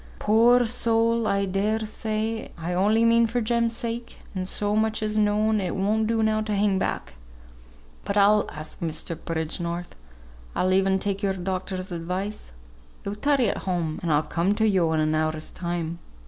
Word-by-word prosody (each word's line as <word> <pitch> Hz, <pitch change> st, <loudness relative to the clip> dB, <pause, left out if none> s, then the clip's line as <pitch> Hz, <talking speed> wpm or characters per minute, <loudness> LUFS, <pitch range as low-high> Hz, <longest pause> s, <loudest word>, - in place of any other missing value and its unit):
"Poor 235 Hz, +3 st, +4 dB
soul! 230 Hz, -1 st, +2 dB
I 200 Hz, -1 st, +1 dB
dare 210 Hz, +3 st, 0 dB
say. 220 Hz, +1 st, -3 dB
I 170 Hz, +2 st, -3 dB
only 210 Hz, +5 st, +3 dB
mean 230 Hz, 0 st, +5 dB
for 235 Hz, +2 st, -1 dB
Jem's 235 Hz, 0 st, 0 dB
sake; 235 Hz, 0 st, -4 dB, 0.2 s
as 185 Hz, 0 st, -2 dB
so 205 Hz, 0 st, 0 dB
much 220 Hz, 0 st, +1 dB
is 215 Hz, 0 st, -1 dB
known, 215 Hz, 0 st, +2 dB
it 180 Hz, -2 st, -2 dB
won't 215 Hz, +3 st, +1 dB
do 225 Hz, 0 st, +1 dB
now 215 Hz, 0 st, +2 dB
to 215 Hz, -1 st, -2 dB
hang 200 Hz, -1 st, +2 dB
back. -, -, -3 dB, 0.9 s
But 200 Hz, 0 st, -2 dB
I'll 205 Hz, +1 st, +4 dB
ask 155 Hz, +1 st, -7 dB
Mr. 165 Hz, 0 st, -2 dB
Bridgenorth. 170 Hz, +2 st, -4 dB, 0.6 s
I'll 185 Hz, 0 st, +2 dB
e'en 190 Hz, 0 st, +3 dB
take 200 Hz, 0 st, -2 dB
your 195 Hz, -2 st, +1 dB
doctor's 185 Hz, 0 st, -4 dB
advice. 180 Hz, -, -4 dB, 0.5 s
Yo 200 Hz, -, -2 dB
tarry 270 Hz, +2 st, +2 dB
at -, -, -2 dB
home, 165 Hz, -3 st, -1 dB
and 170 Hz, -, -1 dB
I'll 150 Hz, +1 st, +3 dB
come 170 Hz, +6 st, 0 dB
to 220 Hz, +1 st, +2 dB
yo 180 Hz, -6 st, +2 dB
in 160 Hz, -, +1 dB
an 155 Hz, 0 st, +1 dB
hour's 155 Hz, 0 st, -1 dB
time. 170 Hz, -1 st, -4 dB
200 Hz, 175 wpm, -25 LUFS, 175-220 Hz, 0.9 s, mean